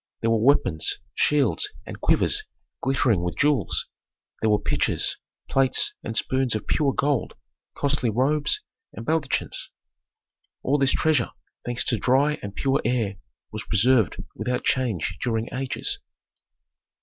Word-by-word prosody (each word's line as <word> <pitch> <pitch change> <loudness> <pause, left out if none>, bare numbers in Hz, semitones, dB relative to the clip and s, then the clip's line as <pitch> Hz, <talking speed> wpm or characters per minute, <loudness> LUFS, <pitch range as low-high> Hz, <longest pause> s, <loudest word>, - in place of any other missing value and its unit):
There 115 - +1
were 115 -1 +2
weapons, 95 - +3 0.2
shields 145 -6 +2 0.2
and - - -9
quivers - - +3 0.4
glittering 130 -8 +2
with 90 0 -3
jewels. 140 - +1 0.6
There 110 - +2
were 105 - +4
pitchers, - - 0 0.3
plates, 135 -2 +2
and 115 -1 -4
spoons 130 -3 +1
of 110 - -3
pure 145 -3 +1
gold, 140 -5 0 0.4
costly 140 -4 +1
robes, 140 +7 +1 0.3
and 115 - -8
baldachins. 155 -2 -1 0.9
All 145 +2 +2
this 135 -1 +4
treasure, 155 -6 +2 0.4
thanks 120 0 0
to 115 - 0
dry 140 +7 +2
and 100 -1 -7
pure 135 +1 +1
air, 115 -5 0 0.3
was 110 -1 -4
preserved 110 -1 +3 0.2
without 125 0 -2
change 120 -11 0
during 115 -2 -2
ages. 130 0 -2
125 Hz, 130 wpm, -25 LUFS, 110-140 Hz, 0.9 s, were